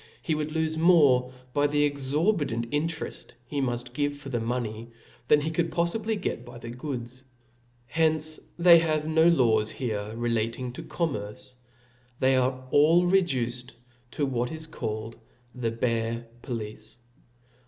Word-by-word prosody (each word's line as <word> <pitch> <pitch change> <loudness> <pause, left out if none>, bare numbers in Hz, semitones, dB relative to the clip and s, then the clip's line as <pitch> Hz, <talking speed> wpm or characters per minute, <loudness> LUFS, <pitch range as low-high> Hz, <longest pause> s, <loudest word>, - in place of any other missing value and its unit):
^^^^5> 165 - +1
^^ - - +1
would 155 0 -2
lofe 160 0 -1
more 145 -8 +5 0.2
by 145 0 +3
the 145 0 +2
exorbitant 145 - 0
inte 155 +2 -1
reft - - -8 0.2
•he 145 -1 0
muft 120 -1 -2
give 145 +1 -1
for 135 -4 -4
money, 115 -1 -3 0.4
than 150 - +5
he 155 +2 -2
could 165 +1 0
poffibly 205 +6 -1
get 120 - -3
by 120 0 -11
the 120 0 -8
goods. 125 -1 -6 0.6
Hence 155 +3 +1 0.2
they 170 -1 +8
have 155 -2 0
no 160 +1 +4
laws 115 -10 +4
here 110 -5 -3
relating, 115 +1 -1
to - - -7
commerce, 135 -6 -4 0.7
they 130 0 +4
are 130 0 0
all 165 +5 +5
reduced 125 -10 0 0.3
to 145 - -1
what 125 -2 -1
is 160 0 -6
called 110 -7 -5 0.4
the 125 -3 -2
bare 115 0 -1 0.2
police. 110 -3 -6
130 Hz, 145 wpm, -27 LUFS, 120-155 Hz, 0.7 s, they